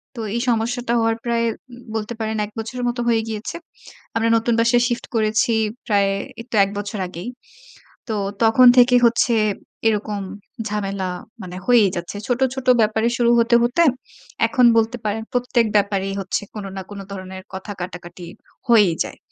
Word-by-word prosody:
তো 230 - -5
এই 235 - 0
সমস্যাটা 235 +1 0
হওয়ার 225 0 +1
প্রায় 235 -1 +1 0.3
উম 245 0 -12
বলতে 220 +1 -3
পারেন 220 0 -2
১ 210 - -13
বছরের 245 +3 -4
মতো 240 0 -3
হয়ে 225 -1 +3
গিয়েছে। 215 +5 -5 0.6
আমরা 225 0 +2
নতুন 230 +1 0
বাসা 230 +1 +4
shift 240 -1 -3
করেছি 220 +1 +2 0.3
প্রায় 200 -3 +2 0.3
এইতো 230 0 -7
১ - - -6
বছর 205 0 -5
আগেই। 180 +5 -7 0.8
তো 220 - -1 0.3
তখন 225 +3 +6
থেকে 245 +1 +6
হচ্ছে 235 +1 +2 0.5
এরকম 210 -1 -1 0.5
ঝামেলা 200 -2 -2 0.3
মানে 180 0 -8
হয়েই 235 -5 +5
যাচ্ছে। 175 +3 -5
ছোট, 245 +1 0
ছোট 265 -1 -6
ব্যাপারে 220 +1 +2
শুরু 240 -1 +3
হতে, 235 +1 +3
হতে 245 +8 +2 0.6
এখন 245 +2 +3
বলতে 225 +2 +2
পারেন 215 +1 -1
প্রত্যেক 245 -2 +1
ব্যাপারেই 195 -1 0
হচ্ছে 190 +1 -2
কোন 210 -2 -6
না 190 - -4
কোন 200 - -8
ধরনের 190 -1 -8
কথা 190 +2 -6
কাটাকাটি 175 -1 -8 0.4
হয়েই 210 -7 +5
যায়। - - -9
225 Hz, 160 wpm, -21 LUFS, 200-235 Hz, 0.8 s, তখন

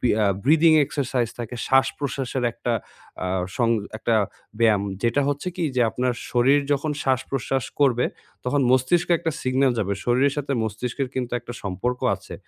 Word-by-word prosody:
B 125 - +1
ইয়া 105 -1 +2 0.2
breathing 160 +3 +5
exercise 130 -4 -1
থাকে, 120 +1 -5
শ্বাসপ্রশ্বাসের 135 -1 0
একটা 120 0 -2 0.5
আ - - -1 0.3
সং 120 -2 +2 0.3
একটা 115 - +1 0.4
ব্যায়াম। 110 -4 +4 0.2
যেটা 120 +4 +2
হচ্ছে 145 +5 -2
কি - - -2
যে 125 - +3
আপনার 125 0 0 0.2
শরীর 135 +4 +4
যখন 145 +2 0
শ্বাসপ্রশ্বাস 130 -1 -1 0.2
করবে, 125 -3 +4 0.4
তখন 140 +3 +1
মস্তিষ্কে 130 +8 +3
একটা 165 - -1
সিগনাল 130 0 +2
যাবে, 100 -2 0
শরীরের 130 +3 +2
সাথে 140 -1 -2
মস্তিষ্কের 125 +5 -3
কিন্তু 125 -2 -3
একটা 120 0 -8
সম্পর্ক 105 +6 -2 0.2
আছে, - - -11
130 Hz, 155 wpm, -24 LUFS, 120-140 Hz, 0.5 s, breathing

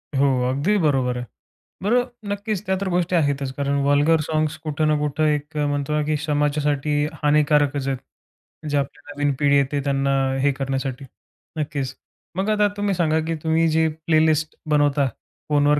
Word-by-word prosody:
हो 140 +1 +4 0.2
अगदी 145 +11 +1
बरोबर 135 -7 +1
आहे. 125 - -4 0.6
बरं 240 +5 +3 0.3
नक्कीच 205 0 -3
त्या 190 0 +1
तर 200 - -1
गोष्टी 180 0 0
आहेतच 140 -4 +1
कारण 140 +1 -1
वल्गर 145 +3 +3
साँग्स 155 0 0
कुठं 155 0 0
ना 155 - +3
कुठं 150 +1 -1
एक 150 +1 -2
अ, 150 - +1
म्हणतो 145 +1 -1
ना 150 - +1
की 155 +1 0
समाजासाठी 145 0 +1 0.2
हानिकारकच 145 -2 +2
आहेत. 135 -1 0 0.7
जे 145 - +1
आपली 140 -1 -3
नवीन 145 -1 0
पिढी 140 -1 +4
येते 140 +1 +1
त्यांना 140 0 +1 0.3
हे 140 +1 +3
करण्यासाठी. 135 -1 -3 0.5
नक्कीच. 140 -3 -3 0.4
मग 190 +3 -1
आता 210 -1 +3
तुम्ही 205 -1 0
सांगा 160 -2 +2
की 165 - -1
तुम्ही 160 +1 +2
जे 160 +1 +3 0.2
प्लेलिस्ट 155 -1 +2
बनवता 145 -2 +3 0.4
फोनवर 145 0 +3
150 Hz, 165 wpm, -22 LUFS, 140-160 Hz, 0.7 s, हो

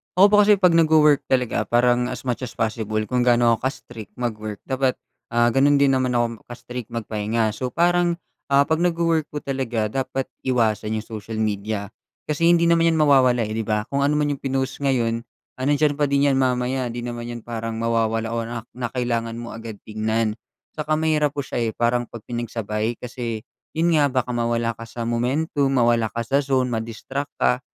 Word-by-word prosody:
Ako 200 +3 +6
po - - +6
kasi 210 0 +6
pag 185 -3 +4
nagwo-work 155 -3 +4
talaga 125 -3 0
parang 120 +1 +3
as 125 -2 -6
much 125 -2 -2
as 125 -3 -6
possible 110 -1 -1
kung 125 +4 -1
gaano 120 -1 +4
ako 115 +3 +1
ka - - +1
strict 110 -4 -11
mag-work, 110 -4 -4
dapat, 130 -1 0 0.3
ah, 120 0 +2
gano'n 140 +4 +4
din 140 -1 +4
naman 130 -2 +1
ako 115 -2 0
ka-strict 120 -1 -7
magpahinga. 110 -1 -1
So 125 +4 -4
parang 175 +5 +2 0.3
'pag, 140 +3 +3
ah, 175 - +2
nagwo-work 165 -2 +1
po 150 - -6
talaga 120 -6 -2
dapat 135 +1 -3 0.2
iwasan 110 -3 +1
'yung 110 - -3
social 110 0 -7
media 105 -1 -2 0.3
kasi 155 +2 +1
hindi 170 0 +5
naman 170 0 +4
'yan 165 - +3
mawawala, 135 -6 +4
eh, 110 - -4
'di 110 - -4
ba? 105 -1 +1
Kung 140 0 +2
ano 150 - +1
man 150 -1 +1
'yung 140 - -4
pinost 135 0 -2
ngayon, 120 -5 +1 0.4
ah, 130 - -1
nandiyan 145 0 +2
pa 145 - +3
din 140 0 +3
'yan 135 - +2
mamaya, 125 0 0
hindi 120 0 -5
naman 120 -1 -5
'yan 120 - -8
parang 115 -1 -4
mawawala 115 0 0
o 115 - -1
na 115 -1 -5
na 125 -1 -4
kailangan 115 -2 -2
mo 120 0 -7
agad 115 -1 -7
tingnan. 110 +1 -1 0.4
Saka 155 0 -1
mahirap 155 -2 +1
po 140 - -2
siya, 125 - -4
eh, 115 -1 0
parang 120 0 +1
'pag 115 -3 -10
pinagsabay 115 -1 -3
kasi, 115 -2 -5 0.3
'yun 165 +2 +2
nga, 150 -3 +4
baka 130 -2 -1
mawala 115 -1 0
ka 115 - -8
sa 115 0 -6
momentum, 130 +5 0
mawala 120 -2 +3
ka 115 +2 -4
sa 135 +4 +1
zone 130 -3 0
ma-distract 115 +5 -4
ka, 125 - +2
125 Hz, 195 wpm, -23 LUFS, 115-140 Hz, 0.4 s, Ako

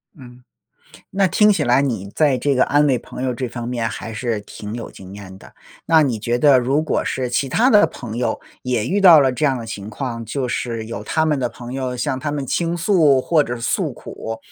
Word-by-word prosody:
嗯。 125 -4 -14 0.7
那 195 0 +2
听 210 +3 +4
起 165 -7 0
来 125 +2 +3
你 115 -8 -2
在 145 -5 +2
这 140 +3 +1
个 130 - +4
安 145 +1 +3
慰 130 -3 +2
朋 - - -9
友 130 -1 -1
这 125 +1 -4
方 120 0 -6
面 120 -2 -2
还 115 0 -7
是 115 -2 -2
挺 105 +1 -8
有 120 - -6
经 95 0 -12
验 95 -2 -10
的。 - - -16 0.3
那 160 -1 +5
你 125 -6 -1
觉 120 +3 -1
得 140 -1 +5
如 130 +4 +1
果 155 - -1
是 130 -1 -2
其 125 +3 -1
他 235 - +3
的 210 -5 +6
朋 115 -3 -8
友 120 - -1 0.2
也 125 -3 -1
遇 200 +7 0
到 175 -6 +8
了 135 -2 +2
这 140 +5 -2
样 135 -3 +2
的 115 - -7
情 105 -2 -7
况， 115 -1 -5
就 130 +4 -3
是 115 -2 -3
有 115 -3 -6
他 160 +9 0
们 150 -2 +1
的 125 -2 -1
朋 120 +1 -10
友 130 -1 -3
向 130 +1 -2
他 145 +2 -3
们 145 -2 -3
倾 170 +5 -1
诉 165 -6 +3
或 155 +3 +2
者 120 -3 -5
诉 - - -1
苦， 115 0 -8
125 Hz, 250 characters per minute, -20 LUFS, 115-145 Hz, 0.7 s, 到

